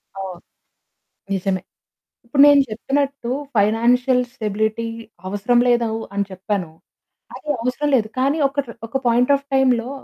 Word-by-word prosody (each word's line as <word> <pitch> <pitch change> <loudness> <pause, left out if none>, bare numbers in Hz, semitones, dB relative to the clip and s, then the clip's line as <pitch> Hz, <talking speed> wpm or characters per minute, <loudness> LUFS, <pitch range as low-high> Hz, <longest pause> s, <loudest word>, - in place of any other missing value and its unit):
అవును 190 -2 -6 1.0
నిజమే. 190 0 -1 0.7
ఇప్పుడు 275 +4 +2
నేను 285 -1 +7
చెప్పినట్టు 275 +3 -2 0.3
ఫైనాన్షియల్ 245 +4 +3
స్టెబిలిటీ 220 -1 -2 0.4
అవసరం 205 +5 +1
లేదు 240 -1 +3
అవ్ 225 0 -3
అని 200 0 0
చెప్పాను. 190 -1 -3 0.7
అది 300 - -9
అవసరం 250 +5 -1
లేదు. 215 -3 +1
కానీ 275 +4 +2
ఒకటి, 275 -3 -3 0.2
ఒక 250 - -1
పాయింట్ 245 +3 +3
ఆఫ్ 280 0 -6
టైమ్‌లో 255 -3 +2
235 Hz, 125 wpm, -21 LUFS, 210-265 Hz, 1.0 s, నేను